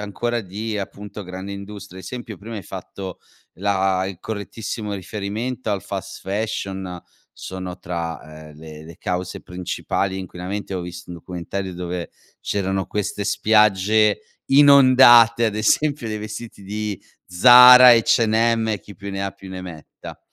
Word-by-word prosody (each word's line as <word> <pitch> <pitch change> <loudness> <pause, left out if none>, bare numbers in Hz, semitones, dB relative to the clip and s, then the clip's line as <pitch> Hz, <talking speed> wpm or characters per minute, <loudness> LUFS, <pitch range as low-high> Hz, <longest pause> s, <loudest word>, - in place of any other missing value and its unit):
ancora 115 +3 -3
di 105 +4 -5
appunto 100 +1 -7
grande 95 +2 -7
industria, 100 -1 -9
ad 95 - -10
esempio, 120 -2 -7
prima 110 +3 -8
hai 100 - -6
fatto 95 +2 -8 0.4
la 95 0 0
il 95 -3 -7
correttissimo 105 0 -6
riferimento 110 +5 -4
al 100 -2 -2
fast-fashion, 95 -3 -5 0.3
sono 95 -1 -7
tra, 80 -2 -6
ehm, 75 - -15
le 80 -1 -11
le 85 - -12
cause 90 0 -4
principali 95 +1 -3
inquinamenti, 95 +2 -6
avevo 90 -2 -4
visto 90 0 -10
un 85 - -7
documentario 90 +2 -6
dove 90 -1 -5 0.3
c'erano 95 -1 -2
queste 105 0 -3
spiagge 105 0 +3 0.3
inondate, 130 -4 +7
ad 105 - -2
esempio 140 +3 +1
dei 110 0 -4
vestiti 110 0 -8
di 105 0 -4 0.3
Zara, 125 +6 +9
H&M 115 0 +2
e 105 -4 -2
chi 100 - -13
più 100 +2 -7
ne 95 0 -4
ha 100 - -3
più 95 0 -14
ne 95 0 -7
metta, 80 -4 -11
100 Hz, 140 wpm, -21 LUFS, 90-110 Hz, 0.4 s, Zara